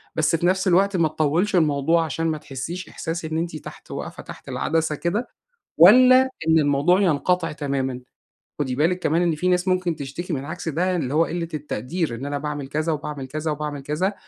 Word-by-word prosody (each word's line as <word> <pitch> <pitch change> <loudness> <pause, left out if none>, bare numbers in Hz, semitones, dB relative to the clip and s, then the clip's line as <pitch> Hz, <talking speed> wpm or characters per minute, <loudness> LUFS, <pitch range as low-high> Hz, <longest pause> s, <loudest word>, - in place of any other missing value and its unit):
بس 155 +1 +2
في 165 - -1
نفس 190 +2 +2
الوقت 190 +2 +3
ما 165 -2 +3
تطوِّلش 155 +6 0
الموضوع 160 0 +2
عشان 165 +1 -2
ما 155 -1 -1
تحسّيش 155 +6 -6
إحساس 165 0 -5
إن 160 0 -3
أنتِ 165 -1 -3
تحت 150 - -10
واقفة - - -6
تحت - - -11
العدسة 160 -1 0
كده، 190 - -2 0.5
والّا 255 +9 +8 0.3
إن 160 0 +5
الموضوع 145 +6 +3
ينقطع 180 0 +1
تمامًا؟ 135 -4 -3 0.6
خدي 130 -3 -1
بالِك 170 +6 +1
كمان 165 0 +1
إن 170 -2 +1
فيه 180 +4 0
ناس 180 0 +1
ممكن 185 -2 +1
تشتكي 155 +5 -5
من 135 -1 -3
عكس 165 +2 -5
ده، 180 +4 0
اللي 135 -5 -2
هو 160 +2 +4
قِلّة 170 0 -3
التقدير. 150 - -3
إن 125 +4 -6
أنا 145 0 -2
باعمل 145 -1 -4
كذا، 155 +4 -1
وباعمل 150 -2 -5
كذا، 155 +3 -3
وباعمل 150 -1 -4
كذا، 160 +8 -1
160 Hz, 195 wpm, -23 LUFS, 145-175 Hz, 0.6 s, والّا